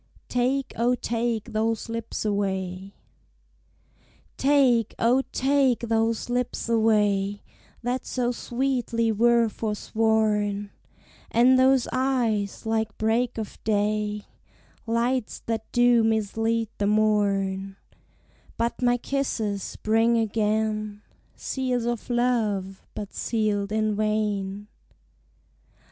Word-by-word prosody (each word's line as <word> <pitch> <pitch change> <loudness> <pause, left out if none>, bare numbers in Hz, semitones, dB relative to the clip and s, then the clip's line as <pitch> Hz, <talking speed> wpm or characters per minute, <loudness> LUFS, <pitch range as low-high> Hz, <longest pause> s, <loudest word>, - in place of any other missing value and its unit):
TAKE, 255 +2 0
O, 240 +2 +2
TAKE 230 -2 -2
THOSE 220 0 0
LIPS 230 -1 -4
AWAY. 190 -2 -2 1.4
Take, 260 -5 +3
O, 245 +3 +3
take 270 -2 +2
those 225 -1 0
lips 245 -1 -2
away, 210 -3 +2 0.4
That 245 +2 -2
so 245 -1 0
sweetly 240 -2 -1
were 235 +2 +4
forsworn; 210 -1 0 0.6
And 255 +3 +5
those 260 -1 +4
eyes, 240 -6 0
like 220 -1 -1
break 230 +3 0
of 220 -2 -7
day, 210 0 0 0.6
Lights 235 +1 -1
that 225 -1 -3
do 240 -1 +4
mislead 225 +1 0
the 200 - +1
morn; 200 -2 +1 0.8
But 235 +2 -1
my 245 0 +3
kisses 225 -7 -2
bring 225 +2 +3
again, 215 -1 -1 0.3
Seals 250 -3 -2
of 240 0 -3
love, 220 -6 0
but 205 -1 -6
sealed 210 -3 -1
in 215 -1 +1
vain. 210 -2 -1
225 Hz, 95 wpm, -25 LUFS, 210-240 Hz, 1.4 s, And